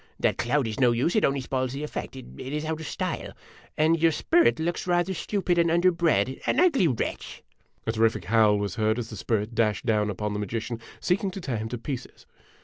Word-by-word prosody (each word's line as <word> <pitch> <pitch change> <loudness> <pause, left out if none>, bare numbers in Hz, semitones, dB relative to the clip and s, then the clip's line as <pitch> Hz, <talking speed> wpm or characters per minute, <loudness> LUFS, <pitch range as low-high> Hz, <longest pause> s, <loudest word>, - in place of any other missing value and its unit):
That - - +1
cloud 130 +3 +1
is 110 +2 -4
no 125 -2 +5
use; 130 - 0
it 215 - +3
only 135 0 +2
spoils 130 0 -2
the 140 +2 -4
effect; 150 - -5
it - - -9
is 150 +4 -4
out 160 0 -2
of 160 - -6
style. - - -4 0.4
And 160 +1 +3
your 165 -1 +5
spirit 335 - +3
looks 170 +3 -2
rather 175 +1 +1
stupid 180 -1 0
and 170 0 +3
under 175 +2 +4
bred 165 -6 +1
an - - +2
ugly 310 - +4
wretch!" 125 -7 -3 0.4
A 110 - +1
terrific 110 -5 +1
howl 105 0 +4
was 100 -3 -3
heard 110 0 +1
as 120 -2 -5
the - - -6
spirit 110 +1 -1
dashed 110 -1 +1
down 105 -2 +2
upon 105 +1 -3
the 105 - -3
magician, 115 +3 -3 0.2
seeking 190 +2 0
to 190 - -7
tear 135 -10 -3
him 110 +1 -4
to 120 - -4
pieces. 125 +2 -7
130 Hz, 220 wpm, -26 LUFS, 110-170 Hz, 0.4 s, no